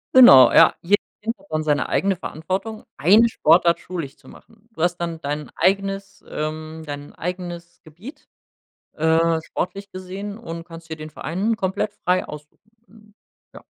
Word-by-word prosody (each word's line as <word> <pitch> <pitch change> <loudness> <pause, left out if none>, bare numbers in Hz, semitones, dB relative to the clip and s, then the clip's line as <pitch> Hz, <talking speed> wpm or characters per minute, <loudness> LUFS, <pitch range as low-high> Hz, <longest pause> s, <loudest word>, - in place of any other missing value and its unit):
Genau, 140 - +9
ja. - - +7
Jedes 200 +4 +2 0.2
Kind 230 +2 -2
hat - - -22
dann 155 0 -1
seine 150 -2 0
eigene 195 +6 +1
Verantwortung, 190 +7 -5
eine 205 +10 +5
Sportart 170 -5 +3
schulisch 165 -7 -6
zu - - -22
machen. 225 0 -19
Du 190 -8 -4
hast 175 0 +1
dann 170 -1 -4
dein 150 +1 -4
eigenes, 195 0 -1
ähm 155 +1 -5
dein 145 -1 -8
eigenes 175 -1 -6
Gebiet, 205 - -13 0.7
äh, 160 +1 +2
sportlich 200 +4 -5
gesehen 190 +3 -7
und 165 -7 -7
kannst 165 -1 -12
dir 160 - -5
den 155 0 -9
Verein 190 +9 -2
komplett 190 +1 -2
frei 185 -3 0
aussuchen. 150 +7 -12 0.2
Hm, 210 +1 -21 0.4
ja. - - -12
175 Hz, 155 wpm, -22 LUFS, 160-200 Hz, 0.7 s, Genau